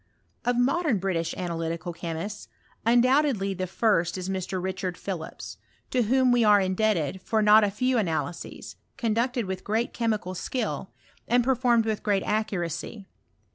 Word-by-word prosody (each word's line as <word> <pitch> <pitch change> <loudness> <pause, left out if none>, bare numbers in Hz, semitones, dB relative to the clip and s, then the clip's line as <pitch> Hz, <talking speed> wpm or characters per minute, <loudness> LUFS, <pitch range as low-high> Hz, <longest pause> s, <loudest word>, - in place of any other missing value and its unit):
Of 245 0 +1
modern 275 +1 +2
British 180 -3 -1
analytical 170 0 -3
chemists, 170 +5 -5 0.4
undoubtedly 245 -4 +3
the 185 0 -3
first 180 -3 +1
is 185 0 -4
Mr. 190 0 -2
Richard 185 -1 -3
Philips; 175 -5 -6 0.3
to 255 - +2
whom 255 +3 +3
we 240 -1 +4
are 210 -1 +6
indebted 190 -3 0
for 220 +3 0
not 210 +1 +7
a 205 - +3
few 250 +5 +1
ana 165 -7 0
lyses, 170 - -9 0.2
conducted 235 0 0
with 190 0 -5
great 225 +4 -1
chemical 215 -5 -1
skill, 250 +7 -3 0.4
and 245 0 +3
per 265 +2 +3
formed 240 -3 +2
with 220 -2 -1
great 200 -3 +1
accuracy. 200 -1 -2
210 Hz, 150 wpm, -26 LUFS, 185-235 Hz, 0.4 s, not